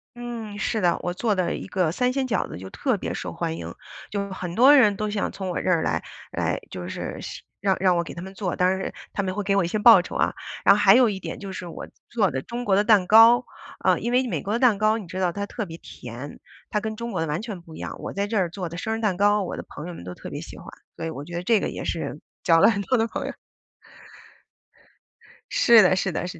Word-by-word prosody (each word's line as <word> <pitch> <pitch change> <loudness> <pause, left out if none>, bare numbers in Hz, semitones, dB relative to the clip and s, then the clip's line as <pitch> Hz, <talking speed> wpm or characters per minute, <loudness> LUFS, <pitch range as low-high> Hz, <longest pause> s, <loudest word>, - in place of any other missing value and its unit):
嗯， 235 -4 -6
是 220 +1 -1
的。 175 -2 +3
我 175 - -2
做 210 +3 0
的 185 -2 0
一 - - -7
个 180 -4 0
三 250 +8 +1
鲜 265 0 -1
饺 230 - 0
子 - - -8
就 95 +1 -8
特 - - -1
别 - - -4
受 - - -5
欢 80 - -3
迎， 85 0 -7 0.4
就 200 -1 -3
很 180 -2 -5
多 260 +6 +7
人 215 -7 +5
都 215 +1 -2
想 205 -1 -2
从 190 -2 -5
我 175 - -2
这 - - -1
儿 170 -3 +3
来， 80 0 -1 0.3
来 - - -1
就 90 -1 -6
是 95 - -5
想 - - -6 0.2
让 195 -1 +2
让 185 -1 +3
我 170 - +1
给 - - -8
他 170 - -6
们 190 +1 -8
做， 190 -3 -3
当 180 0 +3
然 190 0 0
是 - - -4 0.2
他 - - -1
们 190 -2 -2
也 - - -5
会 205 - -1
给 195 0 +1
我 195 - +3
一 - - -1
些 190 - -1
报 210 -2 +8
酬 - - -9
啊。 - - +1 0.3
然 - - +8
后 - - 0
还 195 0 +7
有 250 -1 +6
一 195 -2 -4
点 170 -3 -6
就 195 -1 -7
是 185 -1 -6
我 170 - -8 0.2
做 205 -7 +1
的 130 - -2
中 240 - -6
国 195 - +3
的 205 - +4
蛋 210 -4 +5
糕， 225 +5 +7 0.4
嗯， - - +3
因 235 - -2
为 255 +1 +3
美 - - -2
国 205 - -3
的 230 - 0
蛋 240 -5 +4
糕 215 +1 +3
你 215 - -7
知 185 +2 -5
道 180 -2 +1
它 200 +3 -4
特 220 +1 -5
别 165 0 -8
甜， 125 -2 -9 0.3
它 210 - +1
跟 220 +1 -4
中 235 +1 -5
国 180 - -2
的 165 - -1
完 150 +5 -2
全 215 -6 -7
不 165 -2 -13
一 - - -10
样。 - - -6
我 - - -5
在 200 +1 -1
这 215 +2 -2
儿 185 -3 +1
做 180 0 -5
的 170 - -7
生 220 +4 -2
日 - - -6
蛋 205 -5 0
糕， 205 +1 +3
我 185 - -4
的 - - -6
朋 150 - -8
友 180 - -6
们 165 - -10
都 90 0 -7
特 - - -9
别 - - -5
喜 - - -10
欢， - - -12 0.3
所 165 - -5
以 - - -2
我 140 -2 -7
觉 175 +2 -8
得 175 - -3
这 220 +3 +3
个 - - -2
也 - - -6
是 - - -3 0.2
交 165 -3 +5
了 230 - +6
很 200 -2 -2
多 255 +5 +1
的 225 0 +1
朋 - - -4
友。 - - -4 2.2
是 235 -2 +7
的， 185 -2 +4
是 190 0 -1
的， 175 - -3
是 180 - -8
195 Hz, 310 characters per minute, -24 LUFS, 175-220 Hz, 2.2 s, 报